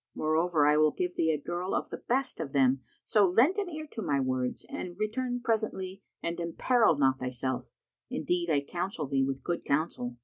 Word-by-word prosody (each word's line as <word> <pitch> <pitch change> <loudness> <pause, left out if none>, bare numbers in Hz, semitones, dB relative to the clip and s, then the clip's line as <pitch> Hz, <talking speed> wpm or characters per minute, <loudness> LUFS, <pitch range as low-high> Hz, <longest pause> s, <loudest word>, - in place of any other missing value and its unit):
Moreover, 155 0 +2
I 150 0 +5
will 155 0 +5
give 180 +3 -3
thee 160 - +2
a 155 - +2
girl 175 +5 -3
of - - -2
the - - -4
best 265 +1 -1
of 140 - -4
them, 135 -1 +3 0.2
so 205 -3 +4
lend 260 - +4
an 395 -3 -2
ear 310 -2 -5
to 225 - -4
my 145 -7 +1
words 130 -1 -1
and 175 -1 -6
return 245 +4 -1
presently 210 -5 -1 0.2
and 170 +1 -2
imperil 175 - +3
not 135 -1 +3
thyself; 130 0 -3 0.4
indeed 175 -1 -1
I 145 -3 +3
counsel 175 +2 -3
thee 135 -1 +1
with 135 0 -2
good 175 - -2
counsel." 140 -5 -1
170 Hz, 195 wpm, -30 LUFS, 140-210 Hz, 0.4 s, I